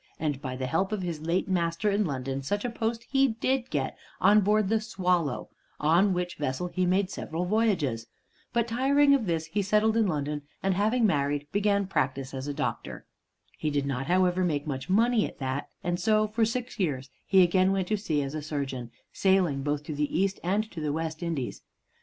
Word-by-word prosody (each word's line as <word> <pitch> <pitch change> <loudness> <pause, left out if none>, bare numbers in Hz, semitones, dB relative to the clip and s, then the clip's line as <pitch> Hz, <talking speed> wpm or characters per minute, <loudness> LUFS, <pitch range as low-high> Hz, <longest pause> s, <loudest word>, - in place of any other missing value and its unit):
And 145 -3 -2
by 130 -3 -4
the 130 0 -3
help 165 +9 0
of 210 -3 -2
his 170 -4 -4
late 170 +4 0
master 175 +2 0
in 205 +1 +1
London, 135 -1 -3
such 205 - -2
a 245 - -1
post 230 0 -2
he 270 0 +4
did 260 0 0
get 135 -3 -2 0.2
on 205 +3 +6
board 210 +1 +2
the 220 +1 +1
"Swallow" 180 - -1 0.3
on 170 +7 +4
which 180 -1 -2
vessel 145 +5 -2
he 185 0 0
made 190 +1 +1
several 165 +3 -3
voyages. 175 - +1 0.4
But 235 0 +1
tiring 280 +4 +4
of 250 -7 +1
this, 165 -2 0
he 195 +6 -1
settled 210 +3 +2
in 225 -2 +3
London, 150 -3 -2 0.2
and, 195 0 +2
having 220 +5 +2
married, 145 -5 +1
began 200 0 +2
practise 135 -7 -1
as 135 +1 -5
a - - -1
doctor. 140 - -4 0.5
He 155 - 0
did 145 -1 0
not, 135 -1 -2
however, 185 +1 +3
make 150 -5 0
much 135 -1 -4
money 225 +3 +3
at - - -12
that, 135 +1 -3
and 175 0 -1
so 215 -1 +3
for 220 +1 +1
six 240 +1 -4
years 140 -7 -1 0.2
he 190 -1 +6
again 185 +2 +3
went 190 -2 0
to 215 - +2
sea 155 -8 -1
as 135 +1 -5
a 155 - -3
surgeon, 140 -5 -4 0.2
sailing 185 -8 +2
both 145 +1 -1
to 155 - -5
the 150 0 -1
East 195 0 +1
and 195 +5 +1
to 160 - -6
the 150 -1 -1
West 160 +1 -3
Indies. 165 -7 -3
180 Hz, 205 wpm, -28 LUFS, 145-210 Hz, 0.5 s, on